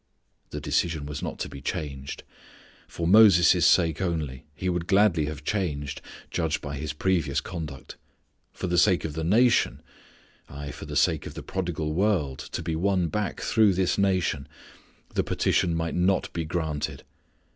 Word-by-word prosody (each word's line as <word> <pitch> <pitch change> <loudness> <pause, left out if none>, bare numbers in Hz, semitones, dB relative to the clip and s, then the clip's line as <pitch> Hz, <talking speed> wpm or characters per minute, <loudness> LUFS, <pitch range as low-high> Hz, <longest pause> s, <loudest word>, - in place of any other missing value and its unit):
The - - -5
decision 80 -4 -1
was 75 0 -5
not - - -4
to - - -2
be 70 - -10
changed. 70 -2 -5 0.6
For 85 - -4
Moses' 95 -4 +6
sake 80 -1 +3
only 80 -7 -3
He 95 - -4
would 90 -1 -1
gladly 95 -6 +4
have 75 -1 -6
changed, 75 -7 -2 0.3
judging 80 -3 0
by 70 -1 -5
His 75 +1 -3
previous 75 -3 0
conduct. 75 -4 -7 0.5
For - - -6
the 90 -1 +2
sake 95 -4 +3
of 80 - -4
the 80 +1 -3
nation 115 +8 +3 0.7
aye, 70 0 -7
for - - -9
the 75 - -6
sake 80 +2 +2
of - - -9
the - - -7
prodigal 85 -5 -3
world 85 -8 +1
to - - -4
be 80 -1 -2
won 90 0 +1
back 105 +5 -3
through 110 -3 +3
this 95 +2 +1
nation, 90 -7 +1 0.7
the - - +1
petition 85 -2 +1
might 80 0 -2
not 90 +2 +1
be 85 -1 -2
granted. 80 -3 -3
80 Hz, 165 wpm, -26 LUFS, 75-95 Hz, 0.7 s, Moses